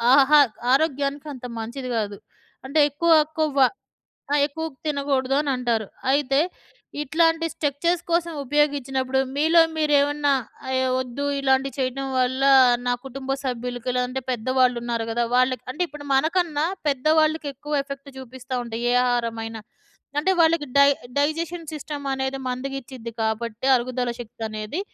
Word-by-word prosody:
ఆహా 285 +2 +6 0.3
ఆరోగ్యానికంత 280 -2 -1
మంచిది 250 +4 -5
గాదు. 205 -2 -2 0.5
అంటే 280 +4 0
ఎక్కువ 330 +4 +1 0.3
కొవ్వు. 285 -4 +4 0.7
ఆ! - - +3
ఎక్కువకు 315 0 -6
తినకూడదు 275 -3 0
అనంటారు. 245 -6 -1 0.3
అయితే 275 -1 +2 0.6
ఇట్లాంటి 325 +3 +2
స్ట్రెక్చర్స్ 325 +4 0
కోసం 340 0 +1
ఉపయోగించినప్పుడు 270 -2 +1 0.2
మీలో 320 +3 +5 0.2
మీరేమన్నా 290 -1 +2 0.4
అయి 260 0 +1
వద్దు 260 +2 -4 0.2
ఇలాంటివి 270 0 +1
చేయటం 265 +1 -2
వల్ల 255 +1 +1 0.4
నా 245 - +2
కుటుంబ 270 0 -7
సభ్యులకి 245 -1 -3
లేదంటే 250 +1 -1
పెద్దవాళ్ళున్నారు 240 -1 0
గదా! 235 +1 0
వాళ్ళకి 255 -1 +2
అంటే 330 - -2
ఇప్పుడు 290 0 -10
మనకన్నా, 315 +1 +1 0.2
పెద్దవాళ్ళకెక్కువ 300 0 +1
ఎఫెక్ట్ 275 0 -8
చూపిస్తా 260 0 -8
ఉంటాయి 230 0 -5
ఏ - - +2
ఆహారమైనా. 230 -2 -2 0.6
అంటే 380 +5 +2
వాళ్ళకి 325 -2 +3
డై 280 0 +7 0.3
డైజెషన్ 325 +3 -1
సిస్టమ్ 295 -1 -6
అనేది 265 0 -2
మందుగిచ్చిద్ది 255 -2 -5
కాబట్టి, 220 +2 -2
అరుగుదల 245 0 -2
శక్తనేది, 220 - -5
270 Hz, 120 wpm, -23 LUFS, 250-295 Hz, 0.7 s, డై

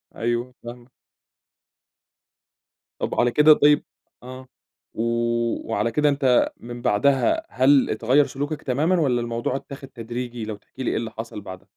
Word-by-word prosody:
أيوه 120 +2 -2
فاهمك. 120 +1 -10 2.1
طَب - - -2
على 120 0 +3
كده 150 +3 +7
طيب 150 0 +4 0.4
آه، 130 +1 -10 0.5
و - - -4 0.7
وعلى 115 +2 0
كده 150 +3 +2
أنت 135 -3 +2
من 120 0 -9
بَعدها 140 - +2
هل 135 +1 +3
اتغيّر 135 +5 +3
سلوكك 145 +3 -4
تمامًا 155 +8 +1
والّا 125 -6 +1
الموضوع 120 +2 -2
اتّاخد 135 0 -8
تدريجي؟ 120 -1 -6
لو 110 -1 -5
تحكي 130 +5 -10
لي - - 0
إيه - - -1
اللي 115 -1 -4
حصَل 110 -2 -7
بَعدها. 95 -2 -10
125 Hz, 145 wpm, -23 LUFS, 120-140 Hz, 2.1 s, كده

